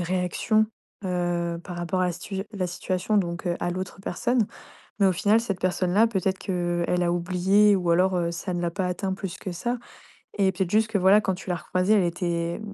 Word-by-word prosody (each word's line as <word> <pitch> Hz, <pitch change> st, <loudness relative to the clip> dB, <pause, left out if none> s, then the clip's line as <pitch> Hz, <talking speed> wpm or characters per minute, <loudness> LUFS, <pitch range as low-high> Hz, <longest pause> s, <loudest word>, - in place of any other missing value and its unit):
réaction, 185 Hz, +5 st, +1 dB, 0.4 s
heu, 175 Hz, -2 st, -1 dB
par 180 Hz, -, -7 dB
rapport 175 Hz, +2 st, -1 dB
à 180 Hz, -, +3 dB
la 175 Hz, -, -1 dB
situ 185 Hz, +3 st, -7 dB
je 195 Hz, -, -1 dB
la 185 Hz, -, 0 dB
situation, 185 Hz, +3 st, -1 dB
donc, 175 Hz, -2 st, -1 dB
heu, 175 Hz, -, 0 dB
à 175 Hz, -, -1 dB
l'autre 185 Hz, +1 st, -5 dB
personne. 235 Hz, +4 st, 0 dB, 0.5 s
Mais 200 Hz, -, +5 dB
au 190 Hz, -, +5 dB
final, 205 Hz, +5 st, +3 dB
cette 200 Hz, -6 st, -3 dB
personne-là, 185 Hz, +4 st, +3 dB
peut-être 190 Hz, -3 st, -1 dB
qu'elle 175 Hz, -1 st, 0 dB
a 175 Hz, -, +1 dB
oublié 185 Hz, +4 st, +3 dB
ou 180 Hz, -3 st, +1 dB
alors, 180 Hz, +2 st, +3 dB
heu, 170 Hz, -1 st, 0 dB
ça 180 Hz, +2 st, -4 dB
ne 175 Hz, -, -2 dB
l'a 170 Hz, -1 st, -1 dB
pas 185 Hz, 0 st, -1 dB
atteint 190 Hz, +1 st, -2 dB
plus 190 Hz, -2 st, -5 dB
que 190 Hz, -, -6 dB
ça. 240 Hz, +8 st, -2 dB, 0.6 s
Et 195 Hz, -1 st, +3 dB
peut-être 185 Hz, -1 st, -2 dB
juste 215 Hz, +1 st, +3 dB
que, 215 Hz, -, 0 dB
voilà, 190 Hz, +3 st, +6 dB
quand 190 Hz, -, 0 dB
tu 185 Hz, -, -9 dB
l'as 175 Hz, -, +1 dB
recroisée, 185 Hz, +5 st, +1 dB
elle 200 Hz, -, +4 dB
était, 170 Hz, 0 st, -1 dB
mmh, 205 Hz, -2 st, -8 dB
185 Hz, 220 wpm, -25 LUFS, 175-195 Hz, 0.6 s, voilà